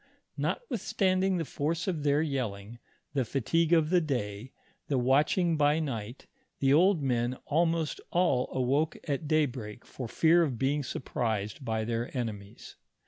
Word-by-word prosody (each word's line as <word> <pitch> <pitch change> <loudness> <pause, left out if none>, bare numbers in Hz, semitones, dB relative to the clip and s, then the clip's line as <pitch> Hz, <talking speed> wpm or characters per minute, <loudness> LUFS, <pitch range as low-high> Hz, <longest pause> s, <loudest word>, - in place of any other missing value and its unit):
Notwithstanding 195 - 0
the 165 - -2
force 160 +6 -2
of 170 -5 -1
their 145 +1 +2
yelling, 120 -6 -4 0.3
the 135 -3 +1
fatigue 155 +7 0
of 165 -2 +4
the 180 -1 +4
day, 125 -5 -3 0.4
the 140 - 0
watching 150 +7 +2
by 150 +1 +3
night, 120 -5 -5 0.3
the 135 0 +3
old 175 0 +4
men 125 -1 0
almost 165 0 0
all 170 -8 +2
awoke 135 +5 0
at 145 +1 -2
daybreak 125 -8 -1
for 125 - -7
fear 165 +8 +4
of 140 -8 0
being 140 +4 +1
surprised 115 -3 -3
by 110 -2 -1
their 115 +1 -2
enemies. 105 -4 -6
140 Hz, 140 wpm, -29 LUFS, 120-165 Hz, 0.4 s, of